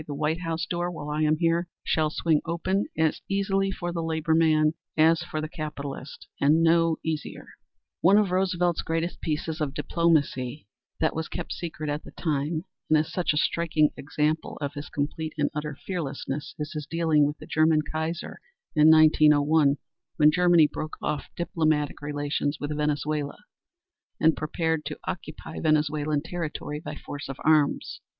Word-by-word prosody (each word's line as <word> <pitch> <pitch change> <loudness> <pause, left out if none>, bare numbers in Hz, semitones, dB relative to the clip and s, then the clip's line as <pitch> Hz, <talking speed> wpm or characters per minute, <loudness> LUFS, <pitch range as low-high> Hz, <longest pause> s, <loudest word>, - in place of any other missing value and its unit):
'The 145 - -4
White 155 +3 0
House 165 -1 -2
door, 175 +1 -2
while 150 -4 -6
I 150 +1 -1
am 155 0 +3
here, 170 +1 +1 0.2
shall 155 -1 +1
swing 155 0 +1
open 185 +4 0
as 160 -1 +1
easily 195 0 +1
for 175 -2 -4
the 170 - -2
labor 160 0 0
man 155 -1 +4 0.2
as 160 +1 +5
for 155 -2 -4
the 155 - -3
capitalist 145 -3 -7
and 155 +4 +4
no 165 0 +4
easier.'" 160 -2 -4 0.5
One 195 +4 +5
of 205 -3 +2
Roosevelt's 180 -2 +1
greatest 165 +2 -2
pieces 155 0 -2
of 145 -2 -2
diplomacy 150 - 0 0.3
that - - +1
was 160 0 -2
kept - - -5
secret 155 -3 -5
at 145 +1 -2
the - - -11
time, 155 +1 -1 0.2
and 155 - +5
is 155 +1 -1
such 180 -2 +1
a 150 - -1
striking 160 -1 +2
example 150 +2 -1
of 145 -1 -3
his 145 0 -7
complete 155 +2 -3
and 145 -1 +1
utter 150 -1 -4
fearlessness 145 -5 -4
is 150 +1 -5
his 150 -2 -5
dealing 160 -2 +2
with 150 +1 -4
the 155 - -11
German 155 0 +3
Kaiser 160 +3 -4 0.4
in 155 +1 +7
1901, 150 -2 +5 0.4
when 150 0 +6
Germany 175 -1 +5
broke 155 +1 -5
off 150 - -3
diplomatic 155 -4 0
relations 145 0 -2
with 145 +1 -3
Venezuela, 150 -1 -1 0.8
and 160 0 +4
prepared 160 0 -1
to 150 0 -5
occupy 160 -2 -6
Venezuelan 150 -1 +1
territory 160 -3 -4
by 165 - -7
force 145 0 -7
of 135 - -5
arms. 155 -2 +2
155 Hz, 165 wpm, -26 LUFS, 150-165 Hz, 0.8 s, in